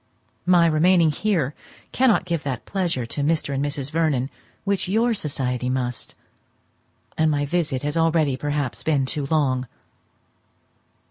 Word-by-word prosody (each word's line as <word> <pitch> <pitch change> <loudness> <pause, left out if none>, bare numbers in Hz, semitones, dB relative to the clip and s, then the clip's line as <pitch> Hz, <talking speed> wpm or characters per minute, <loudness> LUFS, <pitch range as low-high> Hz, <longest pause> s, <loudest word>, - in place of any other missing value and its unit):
My 175 -2 +6
remaining 165 +1 +4
here 165 -5 0 0.4
cannot 245 -8 +3
give 170 -3 -1
that 130 -4 -4
pleasure 175 -11 -1
to 130 +5 -4
Mr. 150 -1 0
and 135 +1 -1
Mrs. 145 -1 -3
Vernon 150 -5 0 0.3
which 200 -2 -1
your 230 +5 +2
society 125 - -2
must; 125 -2 -3 1.0
and 160 0 +4
my 145 -1 +1
visit 150 -4 -1
has 145 +1 -2
already 160 -4 +2
perhaps 145 -1 -2
been 145 -4 +1
too 140 +1 -2
long. 130 -5 +1
150 Hz, 135 wpm, -23 LUFS, 135-170 Hz, 1.0 s, My